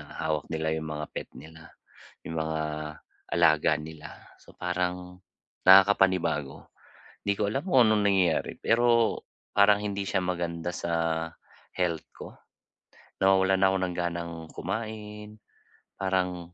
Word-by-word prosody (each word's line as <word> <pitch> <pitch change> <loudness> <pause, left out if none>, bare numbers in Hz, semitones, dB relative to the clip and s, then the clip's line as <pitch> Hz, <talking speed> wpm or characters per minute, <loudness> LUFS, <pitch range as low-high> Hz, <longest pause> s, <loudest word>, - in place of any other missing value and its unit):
na - - -10
hawak 80 -2 -2
nila 80 -1 -2
yung 80 0 -5
mga 75 0 -4
pet - - -6
nila, 80 +1 -13 0.6
yung 80 0 -5
mga 80 0 -2 0.7
alaga 80 -1 +4
nila. 80 -1 -10 0.3
So, - - -19
parang 90 0 -3 0.4
nakakapanibago. 95 -7 +4 0.6
Hindi 100 0 +1
ko - - -2
alam 135 +5 -2
kung 130 -8 +6
anong 105 -1 +2
nangyayari, 95 -5 +2
pero 115 -1 +3 0.3
parang 100 0 +5
hindi 100 -1 -3
siya 95 -2 0
maganda 85 -1 -3
sa 80 -1 -1 0.5
health 85 -4 -1
ko. - - -9 0.9
Nawawalan 95 0 +4
na 95 - +5
ako 95 - +1
ng 90 -1 -2
ganang 85 -1 -3 0.2
kumain, 105 +1 -6 0.6
parang 90 -2 -2
90 Hz, 125 wpm, -27 LUFS, 80-100 Hz, 0.9 s, kung